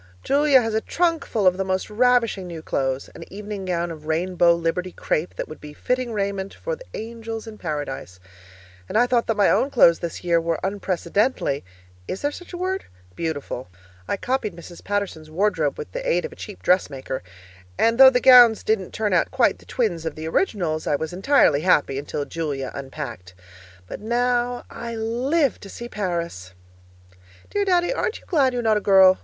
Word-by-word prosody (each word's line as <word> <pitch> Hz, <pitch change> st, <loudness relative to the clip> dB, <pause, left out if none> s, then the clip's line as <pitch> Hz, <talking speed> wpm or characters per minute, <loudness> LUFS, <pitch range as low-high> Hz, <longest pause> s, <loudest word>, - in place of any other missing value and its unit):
Julia 280 Hz, -2 st, +4 dB
has 225 Hz, -1 st, -2 dB
a 220 Hz, -, +1 dB
trunkful 330 Hz, -, 0 dB
of 185 Hz, 0 st, +4 dB
the 190 Hz, -, 0 dB
most 190 Hz, 0 st, -1 dB
ravishing 230 Hz, -3 st, +2 dB
new 165 Hz, -2 st, -7 dB
clothes 135 Hz, -2 st, -1 dB
an -, -, -9 dB
evening 205 Hz, 0 st, -6 dB
gown 175 Hz, -1 st, -1 dB
of 155 Hz, -1 st, -10 dB
rainbow 170 Hz, +1 st, +3 dB
Liberty 170 Hz, +2 st, -2 dB
crepe 165 Hz, 0 st, -2 dB
that -, -, -4 dB
would 155 Hz, -, -11 dB
be 150 Hz, 0 st, -10 dB
fitting 250 Hz, +8 st, -2 dB
raiment 200 Hz, -2 st, -3 dB
for -, -, -4 dB
the -, -, -14 dB
angels 225 Hz, 0 st, -6 dB
in 220 Hz, -1 st, -10 dB
Paradise. 145 Hz, -, -5 dB, 0.7 s
And -, -, 0 dB
I 240 Hz, -, +5 dB
thought 245 Hz, -1 st, +1 dB
that 225 Hz, -, 0 dB
my 205 Hz, -, +4 dB
own 275 Hz, -, +2 dB
clothes 170 Hz, -11 st, +5 dB
this 170 Hz, -2 st, -5 dB
year 170 Hz, -1 st, +2 dB
were 165 Hz, -1 st, -1 dB
unprecedentedly 190 Hz, -, -1 dB, 0.4 s
(is 190 Hz, -, -5 dB
there 290 Hz, -, +1 dB
such 355 Hz, +4 st, -11 dB
a 355 Hz, -, -6 dB
word?) 375 Hz, +2 st, -2 dB, 0.3 s
beautiful. 150 Hz, -6 st, -4 dB, 0.4 s
I -, -, -1 dB
copied 245 Hz, -5 st, -2 dB
Mrs. 170 Hz, 0 st, -12 dB
Paterson's 200 Hz, -6 st, -3 dB
wardrobe 165 Hz, -4 st, 0 dB
with -, -, -7 dB
the -, -, -4 dB
aid -, -, +1 dB
of 475 Hz, -, -6 dB
a -, -, -12 dB
cheap 205 Hz, -3 st, -10 dB
dressmaker, 135 Hz, -7 st, 0 dB, 0.6 s
and 230 Hz, +2 st, +2 dB
though 265 Hz, 0 st, +11 dB
the 250 Hz, -1 st, +2 dB
gowns 245 Hz, -4 st, +7 dB
didn't 215 Hz, -4 st, -1 dB
turn 210 Hz, -3 st, -1 dB
out 175 Hz, -, +3 dB
quite 260 Hz, -3 st, +2 dB
twins 195 Hz, -10 st, -1 dB
of 160 Hz, -2 st, -4 dB
the 155 Hz, +1 st, -6 dB
originals, 165 Hz, -, -1 dB
I -, -, +2 dB
was 160 Hz, +3 st, -4 dB
entirely 190 Hz, -, +3 dB
happy 145 Hz, -6 st, +2 dB
until 145 Hz, 0 st, -4 dB
Julia 145 Hz, -5 st, -4 dB
unpacked. 130 Hz, -, -7 dB, 0.5 s
But -, -, -7 dB
now 245 Hz, +2 st, 0 dB
I 235 Hz, 0 st, -6 dB
live 250 Hz, +6 st, 0 dB
to 200 Hz, -, -11 dB
see 240 Hz, -, -7 dB
Paris! 170 Hz, -, -4 dB, 1.0 s
Dear 410 Hz, 0 st, 0 dB
Daddy, 360 Hz, +2 st, +2 dB
aren't 435 Hz, -, -2 dB
you -, -, -22 dB
glad 275 Hz, -7 st, +2 dB
you're 245 Hz, -1 st, -2 dB
not 220 Hz, -1 st, +3 dB
a -, -, -2 dB
girl? 190 Hz, -2 st, +6 dB
200 Hz, 185 wpm, -23 LUFS, 165-245 Hz, 1.0 s, though